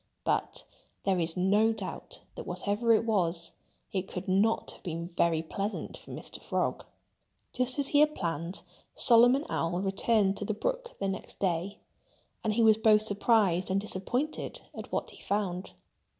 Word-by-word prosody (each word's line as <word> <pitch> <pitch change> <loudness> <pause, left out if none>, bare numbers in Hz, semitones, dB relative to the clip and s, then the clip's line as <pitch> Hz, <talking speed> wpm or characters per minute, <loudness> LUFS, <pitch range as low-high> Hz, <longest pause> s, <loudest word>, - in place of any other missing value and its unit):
But - - 0 0.4
there 190 -2 +2
is 165 +1 -1
no 205 +5 +4
doubt 220 - -6
that - - -8
whatever 215 +3 0
it 225 0 +4
was, 175 -6 +1 0.4
it 190 -1 -2
could 180 - -6
not 200 +4 +2
have - - -13
been 170 -1 -4
very 170 -2 +1
pleasant 200 +6 -4
for - - -14
Mr. - - -7
Frog. - - -1 0.7
Just 255 0 0
as 280 -1 +1
he 290 - +4
had 300 0 +4
planned, 170 +1 -3 0.3
Solomon 245 +4 +6
Owl 170 +2 -1
returned 200 0 +2
to 205 - -3
the 215 - -2
brook - - -3
the 195 - -2
next 195 0 -4
day. 185 +1 -1 0.7
And 220 - +1
he 230 - +3
was 220 -1 +6
both 215 -1 +5
surprised 200 -4 +2
and 190 +1 +2
disappointed 245 - -2
at - - -8
what - - -2
he - - -14
found. 195 -3 -2
200 Hz, 165 wpm, -30 LUFS, 180-225 Hz, 0.7 s, Solomon